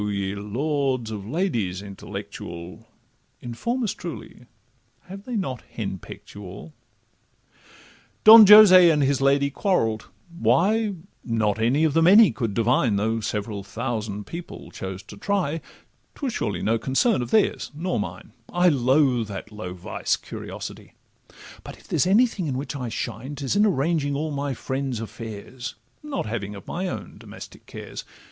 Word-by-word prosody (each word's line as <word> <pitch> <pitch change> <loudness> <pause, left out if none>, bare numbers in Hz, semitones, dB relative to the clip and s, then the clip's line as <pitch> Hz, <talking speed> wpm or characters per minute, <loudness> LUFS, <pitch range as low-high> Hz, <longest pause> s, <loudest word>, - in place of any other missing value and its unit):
ye 100 -1 -2
lords 130 +3 -2
of 100 -2 -6
ladies 115 - -1
intellectual, 90 -3 -8 0.5
Inform 235 - -3
us 210 -2 -1
truly, 160 - -9 0.5
have 195 +3 -11
they 250 - -4
not 135 - -3
hen 95 -4 -4
peck'd - - -12
you 105 - -9
all? 90 -4 -10 1.5
Don 220 -1 +11
Jose 190 -4 +9
and 150 -3 +3
his 135 0 +1
lady 140 +1 +3
quarrell'd—why, 175 - 0 0.3
Not 110 -3 0
any 125 +7 +2
of 155 -3 +2
the 165 - +3
many 200 +6 +7
could 115 -6 -3
divine, 115 -1 +2
Though 110 +3 0
several 105 -1 -4
thousand 105 -1 -4
people 170 +1 -9
chose 95 0 -7
to 100 - -12
try, 165 - -1 0.5
'Twas 270 -5 -3
surely 105 - -2
no 115 +1 +1
concern 135 - +1
of 120 - -4
theirs 215 - +1
nor 175 0 -2
mine; 95 +2 -6 0.2
I 180 0 +3
loathe 130 -4 +2
that 100 0 -7
low 90 -4 -7
vice—curiosity; 90 - -5 0.7
But - - -10
if - - -20
there's - - +1
anything 205 -3 +3
in 130 -3 -2
which 145 +2 -5
I 125 -4 -4
shine, 120 +5 -5
'Tis 140 +4 -2
in 210 +1 +4
arranging 150 -4 0
all 155 +2 -2
my 140 -1 -3
friends' 130 -1 -3
affairs, 115 +3 -7 0.3
Not 295 - -4
having 105 -2 -4
of 100 - -11
my 185 +2 -3
own - - -7
domestic - - -12
cares. - - -8
130 Hz, 150 wpm, -24 LUFS, 105-170 Hz, 1.5 s, Don